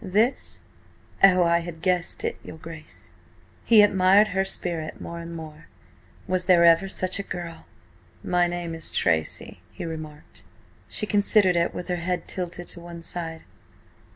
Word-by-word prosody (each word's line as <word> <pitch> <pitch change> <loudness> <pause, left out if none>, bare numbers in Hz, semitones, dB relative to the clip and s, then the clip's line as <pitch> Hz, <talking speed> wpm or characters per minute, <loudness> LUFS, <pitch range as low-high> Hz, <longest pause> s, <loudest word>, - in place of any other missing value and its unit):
"This? 215 +7 0 0.6
Oh, 185 -2 +7
I 170 0 +2
guessed 175 +1 -2
it, - - -3
your - - -10
Grace!" 160 -1 -11 0.5
He 220 -3 +6
admired 200 +1 +4
her 190 0 0
spirit 170 -4 +2
more 170 0 -7
and 170 0 -8
more. 155 -1 -10 0.6
Was 185 -1 +1
there 175 -2 +5
ever 170 +3 +4
such 185 0 -1
a - - 0
girl? 175 -4 -8 0.6
"My 175 0 +1
name 175 -1 -4
is 165 -1 0
Tracy," 80 -1 0
he - - -8
remarked. 155 -2 -9 0.5
She - - -3
considered 205 -3 +3
it 170 0 0
with 180 - -6
her 180 -1 -2
head 180 +1 -3
tilted 175 -1 -5
to - - -7
one 170 -1 -10
side. 165 -2 -4
175 Hz, 155 wpm, -24 LUFS, 165-185 Hz, 0.6 s, Oh